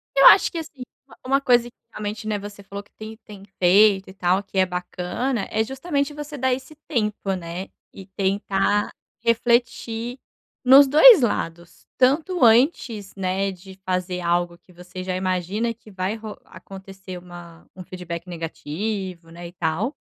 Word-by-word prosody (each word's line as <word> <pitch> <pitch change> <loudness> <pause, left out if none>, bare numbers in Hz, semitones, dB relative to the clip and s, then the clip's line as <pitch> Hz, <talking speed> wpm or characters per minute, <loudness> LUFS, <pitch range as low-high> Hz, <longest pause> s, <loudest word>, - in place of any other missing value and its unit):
Eu - - +5
acho - - +7
que, 340 - -6
assim, 305 -5 -7 0.2
uma - - -17
uma 275 +2 +2
coisa 245 -3 +4
que 240 - -31 0.2
realmente, 215 +1 -5
né, 210 -1 -1
você 205 0 -10
falou 200 +1 -8
que - - -30
tem 220 0 -8
tem 205 -2 -12 0.2
feito 195 +1 +5
e - - -11
tal 185 +1 +1
que 195 0 -9
é 190 - +5
bacana, 180 +6 -3
é 220 0 +1
justamente 280 +3 -2
você 295 0 -7
dar 260 0 +1
esse 265 +4 -7
tempo, 210 -4 -1
né, 175 +1 -6 0.2
e 190 - -11
tentar 195 +1 0 0.3
refletir 235 +1 0 0.4
nos 270 +2 +8
2 315 - +8
lados, 170 -7 -3
tanto 310 +7 +2
antes, 230 - +3
né, 195 +1 -1
de 190 +1 -13
fazer 185 -1 -2
algo 175 0 0
que 180 - -23
você 180 +1 -9
já 185 0 -3
imagina 185 +5 -1
que 220 -1 -18
vai 190 +2 -2
ro 220 -1 -8
acontecer 190 -1 -11
uma 175 -1 -13
um 185 - -9
feedback 175 -1 -7
negativo, 175 +2 -5
né, 170 +1 -9
e 170 - -12
tal. 180 - -2
200 Hz, 165 wpm, -23 LUFS, 180-235 Hz, 0.4 s, nos